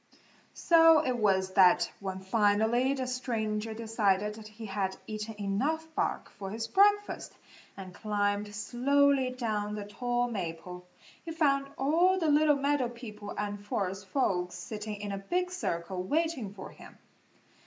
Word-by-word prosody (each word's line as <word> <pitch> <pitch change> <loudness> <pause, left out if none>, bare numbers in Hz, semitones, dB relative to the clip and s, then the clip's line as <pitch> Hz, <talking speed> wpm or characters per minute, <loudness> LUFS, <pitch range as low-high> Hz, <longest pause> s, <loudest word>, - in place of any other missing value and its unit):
So 325 -2 +6
it 255 -1 0
was 190 -4 +1
that 180 -2 +5
when 190 -1 -5
finally 220 +6 +2
the 260 -1 -2
stranger 225 -4 -2
decided 210 -3 0
that 215 0 -11
he 215 +1 -10
had 195 -2 -2
eaten 215 0 -5
enough 265 +12 -1
bark - - -1
for 195 -2 -7
his 225 +2 -4
breakfast, 410 - +2 0.4
and 185 -2 -9
climbed 205 0 -1
slowly 270 +4 +2
down 215 -4 -2
the 205 -1 -5
tall 245 +3 -1
maple, 180 -3 -6 0.4
he 335 - -6
found 280 -4 +1
all 340 +7 +3
the 325 -4 +1
little 295 0 +5
meadow 280 -3 +1
people 215 -4 -9
and 205 0 -4
forest 195 -1 -3
folks 180 -8 0
sitting 210 +3 -6
in 205 -1 -5
a 195 - -3
big 360 - -1
circle 180 - -3
waiting 290 - -1
for 200 -1 -9
him. - - -14
220 Hz, 145 wpm, -30 LUFS, 200-275 Hz, 0.4 s, So